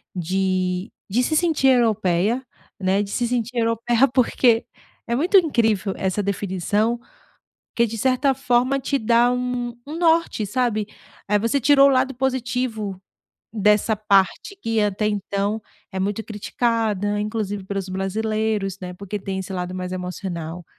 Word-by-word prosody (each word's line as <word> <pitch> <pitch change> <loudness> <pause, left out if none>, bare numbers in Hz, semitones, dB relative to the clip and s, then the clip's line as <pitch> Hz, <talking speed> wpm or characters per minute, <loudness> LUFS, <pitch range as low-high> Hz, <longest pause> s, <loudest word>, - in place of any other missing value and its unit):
de 185 +1 -1 0.2
de 235 +6 +2
se 310 - 0
sentir 310 -5 +3
europeia, 220 -1 +2 0.3
né, 190 +1 +2
de 205 - -4
se 240 +2 0
sentir 245 0 -2
europeia, 230 +2 +2
porque 240 -2 +3 0.4
é 235 - +1
muito 345 - +4
incrível 225 - +2
essa 190 +2 -1
definição, 200 +4 -1 0.8
porque 235 - +4
de 225 0 -5
certa 260 +4 +2
forma 255 +1 +1
te 275 +1 0
dá 235 0 +3
um 250 -1 -2
um 300 +3 -6
norte, 330 -9 +2
sabe. 215 -1 0 0.4
Eh, 210 - +4
você 230 +6 +1
tirou 275 +1 +6
o - - +3
lado 265 0 +2
positivo 245 -6 -2 0.5
dessa 210 +1 +3
parte 205 - +1
que 225 -1 0
até 210 +1 0
então 205 +1 -1 0.3
é 190 - -3
muito 205 +3 -1
criticada, 210 -2 -1
inclusive 210 -2 -3
pelos 195 0 -4
brasileiros, 205 +1 -1
né, 180 0 -6
porque 200 +3 -5
tem 190 0 -4
esse 190 0 -6
lado 180 0 -3
mais 185 0 -4
emocional. 180 -2 -5
215 Hz, 145 wpm, -22 LUFS, 195-245 Hz, 0.8 s, tirou